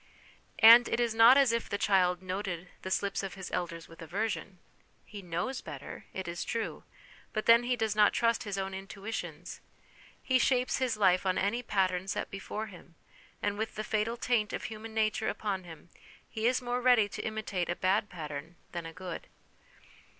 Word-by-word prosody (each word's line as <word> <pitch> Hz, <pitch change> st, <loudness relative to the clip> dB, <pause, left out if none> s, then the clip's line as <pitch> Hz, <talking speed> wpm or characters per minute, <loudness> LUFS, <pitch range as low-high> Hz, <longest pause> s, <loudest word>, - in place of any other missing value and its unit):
And 230 Hz, +2 st, +9 dB
it -, -, 0 dB
is 235 Hz, -2 st, +1 dB
not 230 Hz, +4 st, +8 dB
as 275 Hz, -4 st, +5 dB
if 230 Hz, 0 st, -2 dB
the 200 Hz, -, -1 dB
child 185 Hz, -3 st, +2 dB
noted 185 Hz, -2 st, -4 dB
the 190 Hz, -, -5 dB
slips 195 Hz, +1 st, 0 dB
of 195 Hz, -1 st, -6 dB
his 190 Hz, -2 st, -7 dB
elders 170 Hz, -1 st, -3 dB
with 165 Hz, -, -14 dB
aversion, 195 Hz, +2 st, -3 dB, 0.6 s
lie 205 Hz, -, -6 dB
knows 180 Hz, +9 st, -3 dB
better, -, -, -9 dB
it 190 Hz, -1 st, -5 dB
is 170 Hz, 0 st, -3 dB
true, 230 Hz, -1 st, -3 dB, 0.5 s
but 215 Hz, -, -2 dB
then 230 Hz, 0 st, +7 dB
he 250 Hz, 0 st, +1 dB
does 220 Hz, -3 st, -1 dB
not 210 Hz, -1 st, +5 dB
trust 230 Hz, 0 st, +1 dB
his 200 Hz, -2 st, -4 dB
own 195 Hz, 0 st, -3 dB
intuitions; 195 Hz, +3 st, -6 dB, 0.6 s
he 260 Hz, -1 st, +2 dB
shapes 250 Hz, 0 st, +2 dB
his 255 Hz, -4 st, 0 dB
life 185 Hz, -3 st, +4 dB
on 185 Hz, -1 st, +1 dB
any 205 Hz, +5 st, 0 dB
pattern 190 Hz, -4 st, 0 dB
set 195 Hz, -, -3 dB
before 200 Hz, +2 st, -5 dB
him, 180 Hz, -4 st, -14 dB, 0.5 s
and 205 Hz, 0 st, -1 dB
with 220 Hz, -, -3 dB
the 215 Hz, -, -3 dB
fatal 220 Hz, +2 st, -1 dB
taint 230 Hz, -4 st, 0 dB
of -, -, -3 dB
human 220 Hz, 0 st, -7 dB
nature 220 Hz, +1 st, +1 dB
upon 200 Hz, -3 st, -3 dB
him 165 Hz, 0 st, -12 dB, 0.4 s
he 220 Hz, +1 st, -1 dB
is 255 Hz, 0 st, +1 dB
more 245 Hz, 0 st, -1 dB
ready 245 Hz, -4 st, +5 dB
to -, -, -6 dB
imitate 215 Hz, -5 st, -3 dB
a 175 Hz, -, 0 dB
bad 200 Hz, +4 st, +1 dB
pattern 155 Hz, 0 st, -7 dB, 0.2 s
than 170 Hz, -2 st, -5 dB
a 165 Hz, -, -9 dB
good. 180 Hz, 0 st, -7 dB
205 Hz, 185 wpm, -30 LUFS, 185-225 Hz, 0.6 s, And